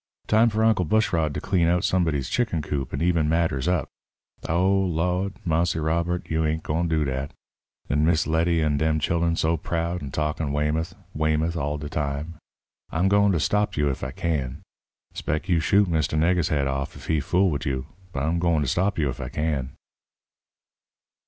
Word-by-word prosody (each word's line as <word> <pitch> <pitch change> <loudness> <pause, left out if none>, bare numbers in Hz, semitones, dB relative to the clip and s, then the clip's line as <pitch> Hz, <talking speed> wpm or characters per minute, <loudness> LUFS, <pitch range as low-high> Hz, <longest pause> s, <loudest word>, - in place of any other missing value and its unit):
Time 110 +2 +4
for 110 0 0
Uncle 110 -5 +3
Bushrod 85 -4 +1
to - - -1
clean 90 -4 +1
out 90 +1 +2
somebody's 80 -8 +1
chicken 105 - 0
coop 70 -3 -3
and - - -2
eben 85 -3 +2
matters 80 -4 +1
up. 90 -7 +1 0.6
Oh, 85 +4 +2
Lawd! 90 +1 0
Marse 85 +1 +1
Robert, 85 +3 -1
you 80 0 0
ain't 80 +1 -1
gwine 85 +3 0
do 80 -2 +1
dat. 65 +1 -3 0.5
'N 75 +2 +1
Miss 80 +1 +3
Letty 80 +1 +2
an' 75 -1 +1
dem 80 +1 +1
chillun 85 +2 +1
so 80 +1 +1
proud 85 +2 -2
and 70 - -6
talkin' 75 0 -1
'Weymouth, 75 +4 -1 0.2
Weymouth,' 80 +2 0
all 75 -2 -2
de 75 0 -6
time! 75 +3 -3 0.5
I'm 90 +4 +1
gwine 100 0 +4
to 85 - +1
stop 105 +4 0
you 75 -1 +2
ef 65 - -6
I 65 - -2
can. 65 -3 -3 0.5
'Spec 75 +5 -3
you 85 -4 +3
shoot 100 +5 +3
Mr. 80 -2 0
Nigger's 85 +1 +2
head 70 -4 +1
off 70 0 -3
ef - - -11
he 80 -1 +1
fool 90 +5 +2
wid 75 +1 -3
you, 65 -2 -2 0.3
but 70 -3 -3
I'm 80 +3 0
gwine 85 -4 +2
stop 95 +9 0
you 75 -3 +1
ef 65 0 -4
I 65 - -5
can." 75 -4 -2
80 Hz, 185 wpm, -25 LUFS, 75-90 Hz, 0.6 s, Time